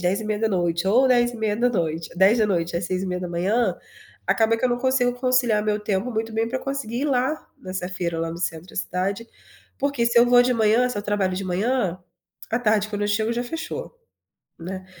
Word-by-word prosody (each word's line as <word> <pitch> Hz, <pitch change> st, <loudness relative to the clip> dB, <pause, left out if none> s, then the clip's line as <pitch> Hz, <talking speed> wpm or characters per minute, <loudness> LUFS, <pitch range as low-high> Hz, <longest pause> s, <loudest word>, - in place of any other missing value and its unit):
22:30, 190 Hz, -2 st, 0 dB
ou 250 Hz, +7 st, +5 dB
22:30, 220 Hz, -9 st, +1 dB
22:00 190 Hz, -4 st, +3 dB
às 175 Hz, -, -2 dB
6:30, 185 Hz, +4 st, -1 dB, 0.5 s
acaba 225 Hz, 0 st, +3 dB
que 225 Hz, -, -3 dB
eu -, -, +4 dB
não 240 Hz, 0 st, 0 dB
consigo 255 Hz, -1 st, +2 dB
conciliar 245 Hz, -4 st, +2 dB
meu 210 Hz, -1 st, +1 dB
tempo 210 Hz, +3 st, -1 dB
muito 225 Hz, 0 st, -3 dB
bem 225 Hz, +1 st, 0 dB
pra 260 Hz, +2 st, -2 dB
conseguir 270 Hz, -3 st, -3 dB
ir -, -, 0 dB
lá 275 Hz, +2 st, 0 dB
nessa 185 Hz, -1 st, -5 dB
feira 175 Hz, -3 st, -3 dB
lá 165 Hz, 0 st, -1 dB
no 165 Hz, -, -6 dB
centro 165 Hz, -1 st, -3 dB
da -, -, -14 dB
cidade. 195 Hz, +5 st, -2 dB, 0.5 s
Porque, 280 Hz, -3 st, 0 dB
se 235 Hz, 0 st, +4 dB
eu 240 Hz, -, +6 dB
vou 245 Hz, 0 st, +6 dB
de 250 Hz, +1 st, +2 dB
manhã, 230 Hz, +2 st, +3 dB
se 230 Hz, -4 st, -4 dB
eu -, -, -4 dB
trabalho 200 Hz, -3 st, 0 dB
de 195 Hz, -, -3 dB
manhã, 190 Hz, 0 st, 0 dB, 0.5 s
à 230 Hz, -, +1 dB
tarde 215 Hz, -3 st, +1 dB
quando 205 Hz, -1 st, -3 dB
eu -, -, +1 dB
chego, 220 Hz, +2 st, +1 dB
já 240 Hz, +1 st, -2 dB
fechou, 320 Hz, -, -6 dB, 0.7 s
né. 185 Hz, +2 st, -6 dB
215 Hz, 185 wpm, -23 LUFS, 185-245 Hz, 0.7 s, eu